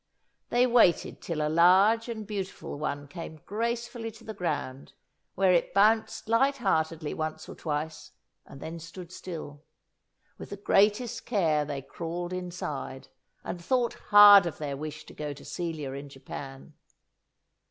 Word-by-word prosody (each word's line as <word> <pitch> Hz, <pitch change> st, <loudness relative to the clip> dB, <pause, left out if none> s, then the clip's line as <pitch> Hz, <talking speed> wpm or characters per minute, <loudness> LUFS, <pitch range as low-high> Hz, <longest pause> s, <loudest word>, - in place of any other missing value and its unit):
They 245 Hz, +1 st, +4 dB
waited 235 Hz, -9 st, +3 dB
till 155 Hz, -3 st, -2 dB
a -, -, +1 dB
large 190 Hz, +8 st, +5 dB
and 220 Hz, -2 st, -5 dB
beautiful 195 Hz, -7 st, -5 dB
one 145 Hz, -1 st, -3 dB
came 160 Hz, +1 st, -9 dB
gracefully 235 Hz, +2 st, -3 dB
to -, -, -15 dB
the 220 Hz, -, -6 dB
ground, 150 Hz, -8 st, -4 dB, 0.4 s
where 190 Hz, -1 st, +4 dB
it 175 Hz, -, +1 dB
bounced 220 Hz, +2 st, +3 dB
light 270 Hz, +5 st, +3 dB
heartedly 160 Hz, -, 0 dB
once 155 Hz, 0 st, -4 dB
or -, -, -8 dB
twice 150 Hz, -1 st, -4 dB, 0.3 s
and 135 Hz, -, -13 dB
then 160 Hz, +3 st, -7 dB
stood 170 Hz, +2 st, -10 dB
still! 160 Hz, -6 st, -8 dB, 0.8 s
With -, -, -8 dB
the 200 Hz, -, -6 dB
greatest 210 Hz, +4 st, +2 dB
care 160 Hz, -9 st, +2 dB
they 140 Hz, -2 st, -5 dB
crawled 175 Hz, +4 st, -5 dB
inside, 175 Hz, -7 st, -5 dB, 0.3 s
and 175 Hz, -1 st, -6 dB
thought 245 Hz, +3 st, +1 dB, 0.2 s
hard 205 Hz, -3 st, +9 dB
of 165 Hz, -, -5 dB
their 145 Hz, -2 st, -4 dB
wish 155 Hz, +2 st, -7 dB
to -, -, -13 dB
go 150 Hz, -1 st, -5 dB
to 140 Hz, -, -14 dB
Celia 160 Hz, -6 st, -4 dB
in 140 Hz, +1 st, -7 dB
Japan. 135 Hz, +1 st, -9 dB
170 Hz, 150 wpm, -28 LUFS, 150-205 Hz, 0.8 s, hard